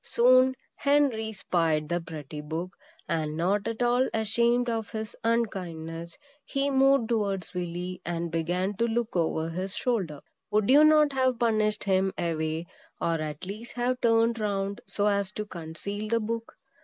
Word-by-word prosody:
Soon 255 Hz, +2 st, +5 dB, 0.2 s
Henry 280 Hz, -6 st, +2 dB
spied 165 Hz, -6 st, 0 dB
the 175 Hz, +2 st, -1 dB
pretty 155 Hz, -2 st, -7 dB
book; 165 Hz, +4 st, -4 dB, 0.4 s
and 155 Hz, -1 st, -1 dB
not 195 Hz, +4 st, +1 dB
at 230 Hz, +1 st, -1 dB
all 245 Hz, +2 st, +3 dB
ashamed 235 Hz, +3 st, +2 dB
of 225 Hz, -2 st, -2 dB
his 220 Hz, -1 st, -5 dB
unkindness, 170 Hz, -8 st, -2 dB, 0.3 s
he 275 Hz, +1 st, -1 dB
moved 270 Hz, -3 st, +4 dB
towards 200 Hz, -5 st, -1 dB
Willy, 180 Hz, +1 st, -4 dB
and 170 Hz, -1 st, -3 dB
began 180 Hz, +4 st, -1 dB
to 235 Hz, -, +2 dB
look 230 Hz, -1 st, -1 dB
over 160 Hz, -1 st, 0 dB
his 185 Hz, +3 st, -4 dB
shoulder. 185 Hz, -, -1 dB, 0.3 s
Would 215 Hz, +2 st, +2 dB
you 290 Hz, +3 st, +8 dB
not 305 Hz, -2 st, +5 dB
have 260 Hz, -2 st, +2 dB
pushed 215 Hz, -3 st, +1 dB
him 190 Hz, -1 st, +2 dB
away, 160 Hz, -1 st, -1 dB, 0.3 s
or 165 Hz, -1 st, 0 dB
at 155 Hz, +2 st, -5 dB
least 215 Hz, +5 st, -7 dB
have 250 Hz, +1 st, -1 dB
turned 230 Hz, 0 st, +3 dB
round 200 Hz, -1 st, -2 dB
so 205 Hz, -, -1 dB
as 200 Hz, -2 st, +1 dB
to 210 Hz, -, -4 dB
conceal 195 Hz, +4 st, -6 dB
the 230 Hz, +1 st, +2 dB
book? 230 Hz, +1 st, -4 dB
205 Hz, 155 wpm, -28 LUFS, 170-235 Hz, 0.4 s, you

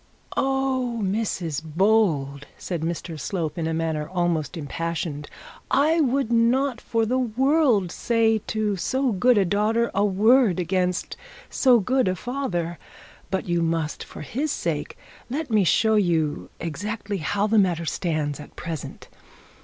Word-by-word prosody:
'Oh, 265 Hz, -3 st, 0 dB
Mrs 190 Hz, -7 st, -1 dB
Bold!' 160 Hz, -5 st, +1 dB
said 175 Hz, -4 st, -4 dB
Mr 165 Hz, -1 st, -4 dB
Slope, 165 Hz, -1 st, -3 dB
in 165 Hz, -2 st, -2 dB
a -, -, -1 dB
manner 160 Hz, -2 st, -2 dB
almost 175 Hz, -6 st, -1 dB
impassioned. 160 Hz, -1 st, -4 dB, 0.4 s
'I 310 Hz, +5 st, +3 dB
would 270 Hz, -3 st, +1 dB
not, 240 Hz, +2 st, +2 dB
for 225 Hz, -1 st, 0 dB
the 255 Hz, +4 st, +1 dB
world, 255 Hz, -, +2 dB
say 225 Hz, 0 st, +2 dB
to 215 Hz, -2 st, 0 dB
so 260 Hz, +7 st, 0 dB
good 235 Hz, +4 st, +3 dB
a 200 Hz, -, +4 dB
daughter 215 Hz, +5 st, +1 dB
a 200 Hz, -, +2 dB
word 210 Hz, 0 st, +4 dB
against 180 Hz, +1 st, -1 dB, 0.3 s
so 250 Hz, -3 st, +5 dB
good 255 Hz, +4 st, +1 dB
a 185 Hz, -, +1 dB
father. 185 Hz, -10 st, -3 dB, 0.5 s
But 190 Hz, -1 st, -2 dB
you 175 Hz, -1 st, +1 dB
must, 165 Hz, -2 st, -1 dB
for -, -, -10 dB
his 270 Hz, -, -2 dB
sake, 160 Hz, -, -3 dB, 0.3 s
let 285 Hz, +1 st, -3 dB
me 215 Hz, -2 st, +4 dB
show 220 Hz, +6 st, +3 dB
you 165 Hz, -7 st, +1 dB
exactly 205 Hz, +5 st, -4 dB
how 200 Hz, +5 st, 0 dB
the 215 Hz, 0 st, +3 dB
matter 175 Hz, -4 st, +1 dB
stands 155 Hz, -4 st, -2 dB
at 150 Hz, -, -12 dB
present. 160 Hz, -4 st, -7 dB
195 Hz, 145 wpm, -24 LUFS, 165-235 Hz, 0.5 s, so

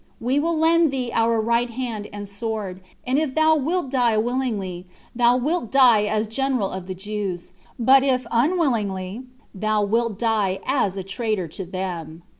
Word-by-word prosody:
We 255 Hz, +4 st, +1 dB
will 330 Hz, +2 st, 0 dB
lend 325 Hz, +1 st, +4 dB
thee 255 Hz, -3 st, -3 dB
our 230 Hz, 0 st, +2 dB
right 235 Hz, +2 st, +1 dB
hand 230 Hz, -3 st, -4 dB
and 205 Hz, 0 st, -6 dB
a -, -, -7 dB
sword; 200 Hz, -2 st, -4 dB, 0.2 s
and 260 Hz, +3 st, +1 dB
if 305 Hz, -4 st, -2 dB
thou 315 Hz, 0 st, +4 dB
wilt 310 Hz, 0 st, -1 dB
die 240 Hz, -5 st, +2 dB
willingly, 215 Hz, -7 st, -2 dB, 0.3 s
thou 240 Hz, +1 st, +4 dB
wilt 270 Hz, -1 st, -1 dB
die 245 Hz, -6 st, +5 dB
as 215 Hz, +1 st, 0 dB
general 250 Hz, -2 st, -1 dB
of 185 Hz, -1 st, -6 dB
the 185 Hz, -, -5 dB
Jews; 195 Hz, -2 st, -5 dB, 0.3 s
but 260 Hz, +3 st, +5 dB
if 255 Hz, -2 st, +1 dB
unwillingly, 235 Hz, -, 0 dB, 0.3 s
thou 215 Hz, +1 st, 0 dB
wilt 225 Hz, 0 st, 0 dB
die 210 Hz, -4 st, +1 dB
as 250 Hz, -8 st, 0 dB
a 190 Hz, -, -3 dB
traitor 200 Hz, -2 st, -2 dB
to 185 Hz, +4 st, -6 dB
them." 175 Hz, -3 st, -5 dB
230 Hz, 170 wpm, -23 LUFS, 200-260 Hz, 0.3 s, die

